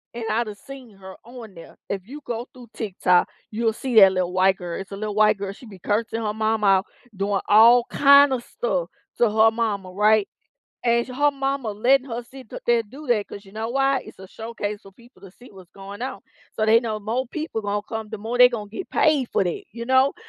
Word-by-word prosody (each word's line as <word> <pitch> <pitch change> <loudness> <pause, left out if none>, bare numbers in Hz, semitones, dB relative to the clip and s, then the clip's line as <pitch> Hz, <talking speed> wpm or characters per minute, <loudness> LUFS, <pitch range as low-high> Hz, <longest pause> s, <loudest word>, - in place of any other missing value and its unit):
And 235 - -5
I 230 +2 +1
done 210 -3 -8
seen 250 -2 -13
her 190 -1 -11
on 235 -4 -11
there. 165 - -13
If 195 -1 -4
you 290 +4 -9
go 235 +1 -5
through 245 -3 -14
TikTok, 180 -4 +1 0.2
you'll 225 0 0
see 250 0 -4
that 195 -2 +8
lil 180 -1 -1
white 190 +1 +3
girl, 175 0 -6
it's 195 - -11
a 195 - -6
lil 210 0 -4
white 215 0 +3
girl, 200 0 -5
she 240 - -15
be 195 - -12
cursing 220 +4 -2
her 210 - -2
mom 220 0 -1
out 195 -1 +4 0.3
doing 195 +1 -1
all 230 +3 +7
kinda 280 -2 +5
stuff - - -3 0.3
to 235 - +4
her 220 +1 +4
mama, 210 -5 -3
right? 210 +2 +3 0.6
And 235 0 +2
sh - - -11
her 290 +3 +2
mama 270 -4 -3
letting 255 +6 +2
her 235 0 -4
sit 255 0 -14 0.2
there 240 0 +4
and 225 -2 -6
do 295 +3 -11
that 215 -4 +1
'cause 200 - -10
you 195 - -17
know 220 +1 -4
why 270 +2 +1
it's - - -14
a 190 - -11
showcase 210 -1 -6
for 195 -3 -16
people 235 -2 -21
to 195 - -13
see 245 +7 -17
what's 190 -3 -15
going 200 +1 -10
on. 260 +1 -5 0.3
So 215 - 0
they 220 +1 +5
know 220 -3 -3
more 235 +5 -3
people 305 -4 -5
gonna 205 0 -2
come, 220 0 -6
the 220 - -6
more 225 +4 -4
they 250 0 +9
gonna 210 -4 -6
get 370 - -7
paid 290 -5 +2
for - - +1
that, 175 - -4
you 235 +2 -6
know? 260 +2 +3
220 Hz, 235 wpm, -23 LUFS, 200-245 Hz, 0.6 s, they